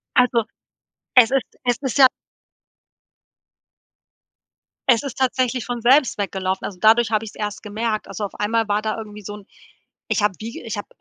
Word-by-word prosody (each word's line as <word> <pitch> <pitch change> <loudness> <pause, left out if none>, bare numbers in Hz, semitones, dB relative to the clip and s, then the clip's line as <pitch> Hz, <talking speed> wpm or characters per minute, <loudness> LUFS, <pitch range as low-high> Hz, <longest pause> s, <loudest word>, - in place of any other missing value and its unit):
Also, 245 -3 +3 0.7
es 250 0 +7
ist 270 -2 -1
es 245 -1 +1
ist 265 -1 -2
ja 265 -2 +9 2.8
Es 235 +2 +5
ist 275 - -6
tatsächlich 255 -1 0
von 240 -1 -4
selbst 260 +1 +4
weggelaufen. 190 -1 -2
Also, 185 -3 -7
dadurch 225 +2 +4
habe 215 0 +1
ich's 210 - -10
erst 210 -1 -4
gemerkt. 215 +1 -3
Also, 195 +2 -6
auf 200 - -4
einmal 220 +1 0
war 205 +1 +1
da 215 0 -2
irgendwie 210 -1 -8
so 205 +1 -7
'n 205 -2 -13 0.6
ich - - +1
habe 210 -1 +2
wie 225 +2 -7
ich 225 -2 -5
habe 205 - -6
225 Hz, 170 wpm, -21 LUFS, 210-245 Hz, 2.8 s, ja